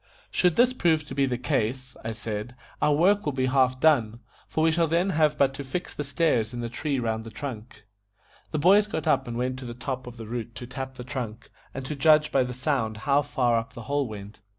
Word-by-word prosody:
"Should 180 -3 +3
this 250 +1 +4
prove 160 -9 +2
to 135 - -8
be 135 0 +2
the 125 -2 -1
case," 125 0 -1
I 110 - -3
said, 110 +1 -5 0.3
"our 150 - +4
work 190 +7 +4
will 150 - -1
be 130 0 0
half 130 -1 +2
done, 120 -8 +3 0.3
for 155 - 0
we 165 - +4
shall 165 0 +2
then 170 +5 +1
have 155 -2 +2
but 135 -1 +3
to 140 - -6
fix 140 +7 -4
the 145 - -3
stairs 135 -6 +1
in 120 - -4
the 120 - -3
tree 140 +4 -2
round 110 -2 -1
the 115 - -8
trunk." 110 -3 -8 0.6
The 155 - -2
boys 195 +7 +5
got 160 -8 -3
up 155 - +2
and 120 -1 -4
went 125 +1 -2
to 130 - -8
the 120 -1 -6
top 130 +1 -4
of 120 -1 -9
the 115 - -7
root 115 0 -5
to 120 - -7
tap 130 +1 -6
the 125 - -7
trunk, 120 -4 -6 0.2
and 135 -1 -6
to 150 - -4
judge 150 +2 +4
by 135 - +3
the 125 - -4
sound 125 -4 -1
how 140 0 +4
far 120 -5 +1
up 115 - -8
the 120 - -8
hole 140 +3 0
went. 105 -1 -9
130 Hz, 245 wpm, -26 LUFS, 120-150 Hz, 0.6 s, boys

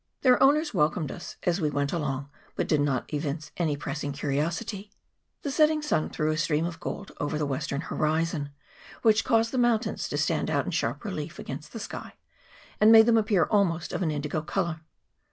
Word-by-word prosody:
Their 250 -2 +5
owners 295 +3 +4
welcomed 150 0 +1
us 175 - -8
as 175 +1 +1
we 155 - +2
went 140 -1 -1
along, 140 -4 -2 0.3
but - - -1
did 150 -2 +2
not 140 0 -1
evince 150 +1 -3
any 155 -4 0
pressing 145 0 -4
curiosity. 160 +8 -2 0.5
The 285 - -2
setting 305 +1 +3
sun 300 - 0
threw 155 0 0
a 155 - -1
stream 155 +1 +1
of 170 -1 -5
gold 200 - -6
over 145 +1 -1
the 150 - 0
western 140 +1 -2
horizon, 155 -2 -1 0.5
which 220 -1 +4
caused 230 -2 +2
the 260 - 0
mountains 240 -1 +1
to - - -2
stand - - 0
out - - +1
in - - -3
sharp - - -2
relief - - -5
against - - -7
the - - -7
sky, - - -7 0.6
and 215 +1 +7
made 220 -1 +9
them 235 0 +4
appear 210 -4 +2
almost 175 -6 +1
of - - -2
an 170 - +1
indigo 150 +1 -2
colour. 160 0 -2
160 Hz, 190 wpm, -27 LUFS, 150-215 Hz, 0.6 s, made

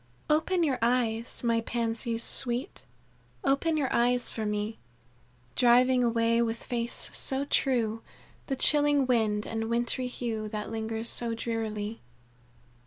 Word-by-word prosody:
"Open 335 +4 +2
your 275 -5 +1
eyes, 235 -1 0
my 230 -1 +2
Pansies 230 0 -2
sweet, 245 - -2 0.6
Open 280 +4 +2
your 275 -4 0
eyes 245 +1 +2
for 220 -2 -3
me, 210 +1 -2 0.8
Driving 250 +1 +5
away 230 0 +2
with 230 0 -2
face 235 -1 -3
so 270 +1 -2
true, 230 -6 +1 0.5
The 270 - -1
chilling 290 0 +4
wind 220 -4 +1
and 225 0 -3
wintry 240 +2 0
hue, 225 -3 -4
That 210 0 -5
lingers 225 0 -3
so 235 -1 -1
drearily. 225 -2 -3
235 Hz, 125 wpm, -29 LUFS, 225-255 Hz, 0.8 s, Driving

